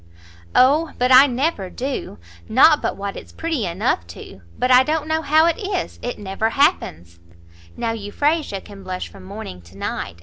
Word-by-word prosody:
"O 295 Hz, +5 st, +4 dB
but 250 Hz, +1 st, +1 dB
I 260 Hz, +2 st, +9 dB
never 255 Hz, -, -1 dB
do! 260 Hz, -, -5 dB, 0.3 s
not 295 Hz, +6 st, +6 dB
but -, -, -2 dB
what 200 Hz, 0 st, -5 dB
it's -, -, -10 dB
pretty 320 Hz, -, -2 dB
enough 170 Hz, -, -1 dB
too; 85 Hz, +3 st, -11 dB, 0.2 s
but 255 Hz, -, +1 dB
I 250 Hz, 0 st, +8 dB
don't 305 Hz, +3 st, -1 dB
know 315 Hz, 0 st, 0 dB
how 315 Hz, +2 st, +4 dB
it 340 Hz, +4 st, +1 dB
is, 385 Hz, -4 st, -4 dB
it 245 Hz, -, -4 dB
never 205 Hz, +2 st, -2 dB
happens. 85 Hz, -, 0 dB, 0.6 s
Now 230 Hz, -, -1 dB
Euphrasia 225 Hz, +2 st, -1 dB
can 200 Hz, -2 st, -13 dB
blush 185 Hz, -1 st, -5 dB
from 195 Hz, -, -14 dB
morning 190 Hz, -, -8 dB
to 85 Hz, +3 st, -17 dB
night. 85 Hz, -3 st, -4 dB
245 Hz, 175 wpm, -21 LUFS, 190-300 Hz, 0.6 s, I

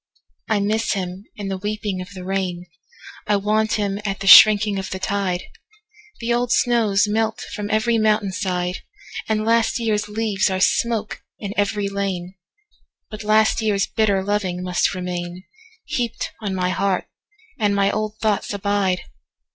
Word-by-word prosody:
I 215 Hz, -2 st, +2 dB
miss 215 Hz, +3 st, 0 dB
him 185 Hz, 0 st, -5 dB
in 200 Hz, -2 st, -5 dB
the 190 Hz, -1 st, -3 dB
weeping 205 Hz, -2 st, -3 dB
of 180 Hz, -, -8 dB
the 185 Hz, -, -7 dB
rain;I 180 Hz, +1 st, -4 dB
want 215 Hz, +2 st, +1 dB
him 200 Hz, -1 st, -1 dB
at 195 Hz, -2 st, -3 dB
the 195 Hz, -, -5 dB
shrinking 205 Hz, 0 st, +8 dB
of 190 Hz, -, -5 dB
the 190 Hz, -, -4 dB
tide; 190 Hz, -2 st, -1 dB, 0.8 s
The 235 Hz, +1 st, 0 dB
old 240 Hz, 0 st, 0 dB
snows 215 Hz, -4 st, +3 dB
melt 220 Hz, +1 st, -1 dB
from 205 Hz, 0 st, -4 dB
every 225 Hz, +2 st, +2 dB
mountain 215 Hz, -2 st, +2 dB
side, 180 Hz, -2 st, -2 dB, 0.5 s
And 215 Hz, 0 st, 0 dB
last 230 Hz, 0 st, +2 dB
year's 210 Hz, -2 st, 0 dB
leaves 210 Hz, -2 st, 0 dB
are 190 Hz, 0 st, -1 dB
smoke 220 Hz, +2 st, 0 dB, 0.2 s
in 200 Hz, -2 st, -5 dB
every 205 Hz, 0 st, 0 dB
lane; 195 Hz, -3 st, -3 dB, 0.8 s
But 215 Hz, 0 st, -7 dB
last 215 Hz, +1 st, +3 dB
year's 205 Hz, -3 st, +1 dB
bitter 200 Hz, -3 st, +1 dB
loving 190 Hz, -3 st, -1 dB
must 180 Hz, -1 st, +1 dB
remainHeaped 210 Hz, -, -5 dB
on 200 Hz, -3 st, -3 dB
my 180 Hz, -1 st, 0 dB
heart, 195 Hz, 0 st, 0 dB, 0.5 s
and 205 Hz, -2 st, +2 dB
my 200 Hz, 0 st, +2 dB
old 215 Hz, 0 st, -3 dB
thoughts 215 Hz, -2 st, 0 dB
abide! 200 Hz, -2 st, 0 dB
205 Hz, 150 wpm, -21 LUFS, 190-215 Hz, 0.8 s, shrinking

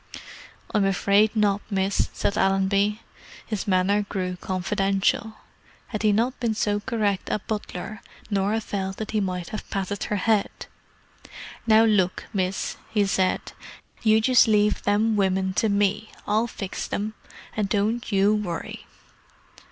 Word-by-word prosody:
"I'm 210 Hz, -2 st, +3 dB
afraid 200 Hz, +3 st, +3 dB
not, 205 Hz, -1 st, +2 dB
miss," 195 Hz, -1 st, 0 dB
said 200 Hz, -, -1 dB
Allenby. 195 Hz, +2 st, +2 dB, 0.4 s
His 215 Hz, -3 st, -4 dB
manner 195 Hz, +2 st, +3 dB
grew 185 Hz, -2 st, -2 dB
confidential; 195 Hz, +3 st, 0 dB, 0.5 s
had 215 Hz, -4 st, -3 dB
he 215 Hz, -1 st, +4 dB
not 235 Hz, +5 st, 0 dB
been 230 Hz, -3 st, 0 dB
so 205 Hz, -1 st, 0 dB
correct 205 Hz, -2 st, -1 dB
a -, -, +1 dB
butler, 210 Hz, 0 st, -5 dB, 0.3 s
Norah 205 Hz, +3 st, +1 dB
felt 190 Hz, -2 st, -4 dB
that 220 Hz, -, -5 dB
he 215 Hz, -1 st, +1 dB
might 180 Hz, -3 st, -3 dB
have 215 Hz, -, -7 dB
patted 195 Hz, +1 st, -3 dB
her 210 Hz, -, -1 dB
head. 210 Hz, +1 st, +2 dB, 1.2 s
"Now 220 Hz, 0 st, +6 dB
look, 190 Hz, -5 st, +1 dB
miss," 190 Hz, -1 st, -1 dB
he 210 Hz, -2 st, +2 dB
said. 190 Hz, -1 st, 0 dB, 0.5 s
"You 220 Hz, -1 st, +4 dB
just 250 Hz, +1 st, +5 dB
leave 210 Hz, -1 st, +3 dB
them 210 Hz, +2 st, +2 dB
women 190 Hz, -1 st, +1 dB
to 220 Hz, +3 st, +1 dB
me; 205 Hz, +1 st, +1 dB, 0.2 s
I'll 215 Hz, +3 st, +1 dB
fix 195 Hz, -4 st, -5 dB
them. 215 Hz, +2 st, -3 dB, 0.4 s
And 210 Hz, -2 st, -1 dB
don't 220 Hz, +4 st, 0 dB
you 200 Hz, +1 st, +4 dB
worry." 195 Hz, -6 st, -4 dB
205 Hz, 140 wpm, -25 LUFS, 195-215 Hz, 1.2 s, Now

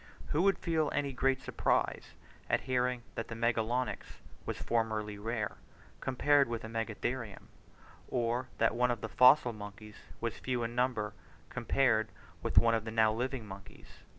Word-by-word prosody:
Who 155 Hz, -, +2 dB
would 195 Hz, +1 st, +4 dB
feel 160 Hz, -3 st, 0 dB
any 140 Hz, -1 st, 0 dB
great 135 Hz, +1 st, +1 dB
surprise -, -, 0 dB, 0.3 s
at -, -, +2 dB
hearing 125 Hz, -1 st, 0 dB
that 115 Hz, -, -4 dB
the 115 Hz, -, -6 dB
Magalonyx 115 Hz, +2 st, -1 dB, 0.3 s
was -, -, -2 dB
formerly 110 Hz, -3 st, -1 dB
rare 110 Hz, 0 st, -3 dB, 0.4 s
compared 140 Hz, +2 st, +3 dB
with 115 Hz, -1 st, -3 dB
the 110 Hz, -, -6 dB
Megatherium, 115 Hz, 0 st, -4 dB, 0.6 s
or 120 Hz, 0 st, -1 dB
that -, -, +3 dB
one 125 Hz, +1 st, +2 dB
of 120 Hz, -2 st, -1 dB
the 110 Hz, -, -4 dB
fossil 125 Hz, 0 st, +6 dB
monkeys 105 Hz, 0 st, -10 dB, 0.2 s
was 115 Hz, -1 st, -3 dB
few 125 Hz, -2 st, -1 dB
in 115 Hz, 0 st, -3 dB
number 120 Hz, -4 st, 0 dB, 0.4 s
compared 115 Hz, -5 st, +2 dB, 0.3 s
with -, -, -3 dB
one 115 Hz, 0 st, +6 dB
of 115 Hz, -1 st, +1 dB
the 110 Hz, -, -5 dB
now 110 Hz, -1 st, +3 dB
living 125 Hz, 0 st, -3 dB
monkeys? 100 Hz, -1 st, -12 dB
115 Hz, 155 wpm, -32 LUFS, 110-130 Hz, 0.6 s, fossil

